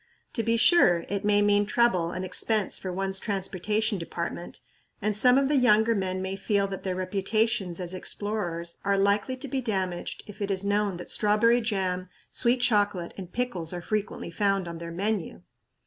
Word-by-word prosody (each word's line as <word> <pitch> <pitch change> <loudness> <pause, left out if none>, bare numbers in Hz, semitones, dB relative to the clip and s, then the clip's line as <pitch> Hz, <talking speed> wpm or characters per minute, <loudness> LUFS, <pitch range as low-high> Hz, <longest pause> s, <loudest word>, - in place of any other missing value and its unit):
To 230 - 0
be 230 0 +1
sure, 175 - +5
it 200 0 -2
may 205 0 +3
mean 205 0 +3
trouble 215 -8 +2
and 185 +2 -4
expense 210 +2 0
for 185 - -4
one's 190 +1 -1
transportation 205 +1 -1
department, 170 +1 -5 0.4
and 210 0 -1
some 250 +4 +5
of 275 0 +3
the 295 - +2
younger 230 -2 +4
men 185 -2 -2
may 190 0 -3
feel 200 0 0
that 195 - -5
their 185 -1 -2
reputations 195 0 0
as 180 0 -4
explorers 180 -3 -3
are 200 0 +2
likely 200 +6 +1
to 275 +2 -5
be 265 0 -2
damaged 190 -6 -3
if 205 0 -12
it 200 - -1
is 195 0 0
known 205 -2 +1
that 175 - -7
strawberry 225 +3 +3
jam, 185 -5 -2 0.2
sweet 245 0 +1
chocolate 205 -7 +1
and 185 -3 -8
pickles 190 -10 -2
are 175 - -4
frequently 210 -4 -3
found 195 0 0
on 170 -1 -6
their 170 0 -6
menu! 190 - -2
200 Hz, 180 wpm, -27 LUFS, 185-220 Hz, 0.4 s, sure